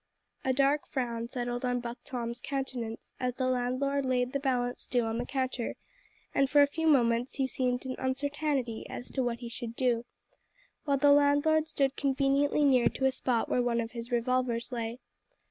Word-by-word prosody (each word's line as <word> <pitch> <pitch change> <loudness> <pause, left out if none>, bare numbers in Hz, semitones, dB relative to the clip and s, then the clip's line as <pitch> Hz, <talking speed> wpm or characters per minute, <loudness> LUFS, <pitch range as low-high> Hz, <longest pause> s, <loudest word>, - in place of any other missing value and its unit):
A 260 - +2
dark 275 +3 +2
frown 235 -3 -2
settled 245 0 -3
on 245 -1 +1
Buck 240 +1 -6
Tom's 235 -1 -4
countenance, 255 -5 -4
as 250 -1 -1
the 260 - -1
landlord 255 +3 0
laid 250 -1 0
the 280 - +1
balance 250 -3 -1
due 245 -2 +1
on 225 +1 -2
the 245 - -3
counter, 260 -3 -2 0.6
and 275 -1 +3
for 290 0 +6
a - - +7
few 320 +3 -2
moments 240 -4 +3
he 270 - +1
seemed 255 -1 -1
in 260 -1 -3
uncertainty 275 -2 -1
as 245 - -7
to 265 - -1
what 240 -1 -2
he 240 - -5
should 235 0 -6
do, 240 -2 +1 0.8
while 280 -2 +2
the 285 +2 +5
landlord 290 +2 +4
stood 275 -3 0
conveniently 275 +1 +2
near 260 -4 +5
to 265 - -1
a 265 - +4
spot 250 -3 0
where 250 - +1
one 240 -1 +1
of 230 0 -3
his 235 0 -7
revolvers 245 0 0
lay. 230 -1 -3
255 Hz, 185 wpm, -30 LUFS, 240-275 Hz, 0.8 s, a